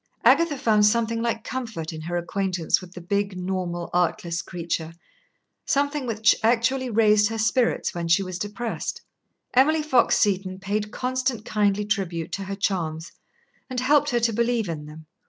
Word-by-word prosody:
Agatha 295 +2 +4
found 220 -5 +3
something 230 +2 +2
like 230 -1 -1
comfort 220 -12 -5
in 155 - -7
her 175 +2 -3
acquaintance 180 -1 0
with 180 -1 -12
the - - -6
big, 200 +2 -1
normal, 180 -2 -3
artless 170 -1 0
creature 165 -2 -4 0.7
something 285 -1 0
which 220 -1 +3
actually 245 +3 +2
raised 210 -2 +4
her 225 - -4
spirits 225 +3 +1
when 170 -1 -3
she 170 +4 +3
was 185 -1 -6
depressed. 210 +3 -4 0.5
Emily 305 +5 +4
Fox 260 -5 +3
Seton 190 -2 0
paid 205 +2 -2
constant 255 -3 -2
kindly 210 -1 +1
tribute 185 -6 -2
to 195 - -4
her 195 +1 -4
charms, 170 -5 -2 0.6
and 255 -1 -2
helped 290 +3 +3
her 240 -3 +1
to 230 -1 +1
believe 235 -1 +1
in 150 -3 -5
them. 155 +1 -11
210 Hz, 160 wpm, -24 LUFS, 180-235 Hz, 0.7 s, Agatha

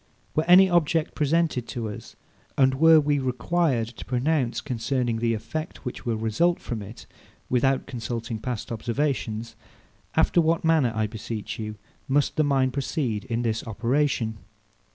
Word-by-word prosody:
Were 155 - +1
any 180 +2 +8
object 165 -3 +1
presented 155 -4 +1
to 115 -2 -4
us, 105 - -9 0.4
and 130 -1 +4
were 160 +3 +6
we 145 -1 +1
required 130 0 0
to 125 - -10
pronounce 130 0 0
concerning 120 -2 -1
the 115 0 +1
effect, 155 +11 -6
which 125 - -6
will 115 - +1
result 115 +11 +1
from 115 -3 -5
it, 100 +3 -10 0.5
without 130 +2 +2
consulting 115 -2 -4
past 120 -1 -4
observation; 115 -1 -1 0.7
after 175 - +4
what 165 +1 +1
manner, 160 -7 +3
I 110 0 +1
beseech 110 0 -5
you, 110 -1 -4 0.3
must 140 +1 +1
the 155 - +3
mind 135 -3 +2
proceed 130 -6 -2
in 120 0 -2
this 115 -1 -1
operation? 115 0 0
125 Hz, 150 wpm, -25 LUFS, 115-150 Hz, 0.7 s, any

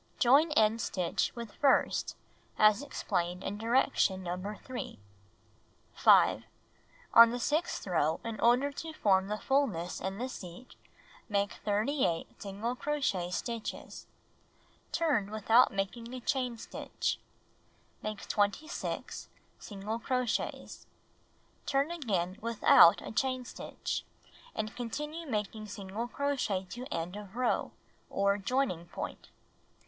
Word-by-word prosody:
Join 285 +6 +5
end 220 -3 +3
stitch 180 -4 -1
with 235 -3 -7
first 280 - +2 0.4
as 215 +2 +5
explained 180 -10 -2
in 205 +2 -4
direction 225 -5 +2
No. 185 +4 -4
3. 255 - -6 1.0
5. - - +5 0.7
On 230 0 +10
the 245 +1 -3
sixth 310 +8 -1
row, 160 -4 +1
in 225 -2 -5
order 250 +5 +4
to 320 +3 -7
form 190 -8 +3
the 210 +1 -2
fullness 220 -11 0
in 190 +1 -3
the 250 +3 -2
seat, 185 -1 -10 0.6
make 200 -1 +1
38 210 - -1
single 205 +5 -3
crochet 255 -12 -1
stitches. 230 +4 -5 0.8
Turn 290 -12 +1
without 220 +3 +4
making 200 +5 -3
a - - -5
chain 250 -1 -1
stitch. - - -3 0.8
Make 215 -1 -5
26 205 - -2 0.3
single 210 +2 -5
cro 250 +1 0
chets. 235 - -3 0.8
Turn 280 +3 +1
again 200 - -2
without 230 -6 +6
a - - -6
chain 255 +2 0
stitch, - - -5 0.5
and 215 0 -3
continue 300 +7 -5
making 215 -1 -3
single 205 +2 -5
crochet 250 -9 -1
to 250 +2 -6
end 170 +3 -3
of 205 0 -9
row, 250 0 0 0.4
or 200 +1 +1
joining 195 -6 -1
pomt. - - -6
6. - - -22
220 Hz, 120 wpm, -31 LUFS, 195-255 Hz, 1.0 s, On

